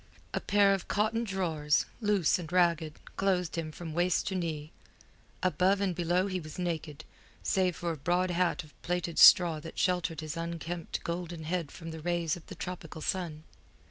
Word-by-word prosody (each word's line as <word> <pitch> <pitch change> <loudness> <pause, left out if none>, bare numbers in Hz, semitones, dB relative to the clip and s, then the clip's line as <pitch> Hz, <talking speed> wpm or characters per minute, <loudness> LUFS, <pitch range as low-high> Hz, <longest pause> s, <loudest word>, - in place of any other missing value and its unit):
A - - 0
pair 200 -1 +4
of 195 - -3
cotton 220 +3 +1
drawers, 165 -8 +1 0.2
loose 205 -6 +3
and 170 -2 -7
ragged, 170 -3 +2 0.2
clothed 185 -3 +1
him 165 -2 -3
from 160 0 -7
waist 175 +2 +2
to - - -4
knee; 160 -4 -3 0.7
above 185 +2 +3
and 195 -2 +1
below 175 +2 +1
he 185 -2 -2
was 155 -2 -9
naked, 160 -3 -3 0.4
save 185 -2 +1
for 170 -1 -2
a 160 - -4
broad 175 +5 +1
hat 175 0 +1
of 150 - -17
plaited 175 -2 -2
straw 170 -4 +8
that 165 +1 -10
sheltered 180 -3 0
his 155 0 -5
unkempt 170 0 -4
golden 170 -1 -4
head 165 -1 -2
from 165 -2 -8
the 160 - -7
rays 170 -1 0
of 175 - -13
the - - -8
tropical 170 -3 -6
sun. 165 -5 -2
175 Hz, 175 wpm, -30 LUFS, 160-185 Hz, 0.7 s, straw